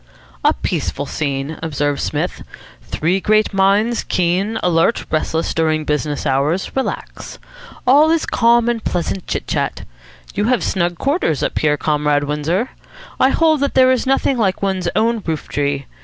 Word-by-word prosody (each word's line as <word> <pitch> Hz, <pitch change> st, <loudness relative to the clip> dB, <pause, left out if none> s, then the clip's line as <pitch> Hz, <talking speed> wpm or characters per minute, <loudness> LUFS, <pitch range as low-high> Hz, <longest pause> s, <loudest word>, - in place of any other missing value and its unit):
"A -, -, +4 dB
peaceful 100 Hz, -, -3 dB
scene," 140 Hz, +1 st, -3 dB
observed 145 Hz, -2 st, -1 dB
Psmith. -, -, -2 dB, 0.4 s
"Three 175 Hz, +5 st, -1 dB
great 215 Hz, +2 st, +2 dB
minds, 200 Hz, +4 st, +2 dB
keen, 185 Hz, +5 st, 0 dB
alert, 175 Hz, +5 st, +2 dB
restless 160 Hz, +1 st, -1 dB
during 155 Hz, -1 st, 0 dB
business 150 Hz, 0 st, -2 dB
hours, 145 Hz, +6 st, 0 dB
relax. 265 Hz, -, -4 dB, 0.5 s
All 290 Hz, +5 st, +5 dB
is 330 Hz, -1 st, +2 dB
calm 235 Hz, 0 st, +3 dB
and 235 Hz, -2 st, -1 dB
pleasant 175 Hz, +1 st, -2 dB
chit -, -, -3 dB
chat. -, -, -2 dB, 0.5 s
You 205 Hz, -, 0 dB
have 245 Hz, 0 st, +1 dB
snug 175 Hz, -2 st, -1 dB
quarters 275 Hz, -, 0 dB
up -, -, -1 dB
here, 150 Hz, -1 st, +2 dB
Comrade 150 Hz, -1 st, +1 dB
Windsor. 150 Hz, -, -1 dB, 0.5 s
I 260 Hz, -, +5 dB
hold 315 Hz, +1 st, +3 dB
that 280 Hz, 0 st, -1 dB
there 260 Hz, 0 st, +6 dB
is 260 Hz, 0 st, 0 dB
nothing 270 Hz, -1 st, +1 dB
like 195 Hz, -3 st, 0 dB
one's 190 Hz, -3 st, 0 dB
own 225 Hz, +1 st, +1 dB
roof 160 Hz, -2 st, -3 dB
tree. 140 Hz, -1 st, -2 dB
180 Hz, 155 wpm, -18 LUFS, 150-230 Hz, 0.5 s, there